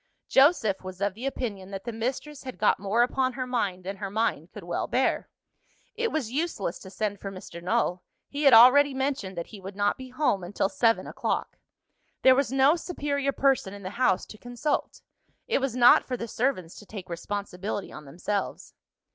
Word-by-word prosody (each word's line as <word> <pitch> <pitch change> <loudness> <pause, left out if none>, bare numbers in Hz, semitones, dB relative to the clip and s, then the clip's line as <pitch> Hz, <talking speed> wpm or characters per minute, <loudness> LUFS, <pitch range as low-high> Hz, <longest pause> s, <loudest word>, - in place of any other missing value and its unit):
Joseph 265 - +4
was 185 0 -8
of 200 -1 0
the 235 +7 -5
opinion 205 -8 -4
that 195 -1 -6
the 235 - -4
mistress 255 +6 -4
had 255 -2 -8
got 210 - +3
more 205 +5 +2
upon 255 +1 0
her 255 0 -3
mind 205 -8 -2
than 195 +2 -5
her 195 -1 -4
mind 220 +3 -1
could - - -10
well - - -2
bear. - - 0 0.6
It 465 -1 -1
was 270 -8 -2
useless 275 - -2
to 190 - -11
send 205 +1 -3
for 195 - -5
Mr. 185 -2 -9
Null; 180 0 0 0.3
he 285 - -5
had 275 - +7
already 265 +4 +7
mentioned 265 -9 -2
that 170 - -3
he 200 - -9
would 190 +1 -8
not 205 +3 0
be 260 0 -8
home 255 -8 0
until 195 +2 -1
seven 230 +1 +2
o'clock.. - - -3 0.6
There 260 - +8
was 270 0 +1
no 270 +3 +5
superior 285 -5 -2
person 265 -8 +1
in 200 - -11
the 185 - -5
house 220 -4 +1
to 215 - -13
consult. 245 +5 -3 0.5
It 455 - +1
was 265 -3 -1
not 245 -1 +7
for 250 - -4
the 230 - -5
servants 220 -8 -1
to 210 - -15
take 195 -3 -8
responsibility 200 +2 -4
on 150 - -10
themselves. 180 +8 -4
225 Hz, 195 wpm, -27 LUFS, 195-265 Hz, 0.6 s, There